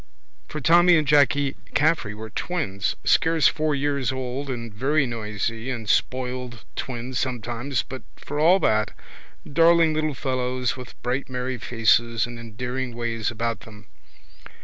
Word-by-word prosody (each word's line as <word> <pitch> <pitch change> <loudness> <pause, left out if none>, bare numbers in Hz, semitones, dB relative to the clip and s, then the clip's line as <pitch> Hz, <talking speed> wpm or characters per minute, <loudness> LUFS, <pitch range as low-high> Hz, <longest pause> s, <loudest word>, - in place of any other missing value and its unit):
For 155 - -5
Tommy 170 +3 +6
and 155 -2 0
Jacky 140 -1 +3 0.2
Caffrey 150 -9 +2
were 110 0 -8
twins, 100 - -2
scarce 160 -1 +4
four 155 -1 +1
years 140 -2 0
old 130 +1 -4
and 115 -4 -5
very 140 +6 +1
noisy 115 0 -3
and 115 -4 -4
spoiled 125 0 -1
twins 125 0 -4
sometimes 120 +1 -2
but 130 0 -8
for 145 +1 -5
all 170 +5 +6
that 110 -6 +1 0.5
darling 165 +1 +4
little 155 -2 -1
fellows 130 -1 -1
with 125 -2 -10
bright 125 +3 -2
merry 125 0 -3
faces 115 -1 +2
and 120 0 -8
endearing 125 +2 -4
ways 115 -2 -2
about 115 0 -2
them. 105 -1 -14
125 Hz, 140 wpm, -24 LUFS, 115-145 Hz, 0.5 s, Tommy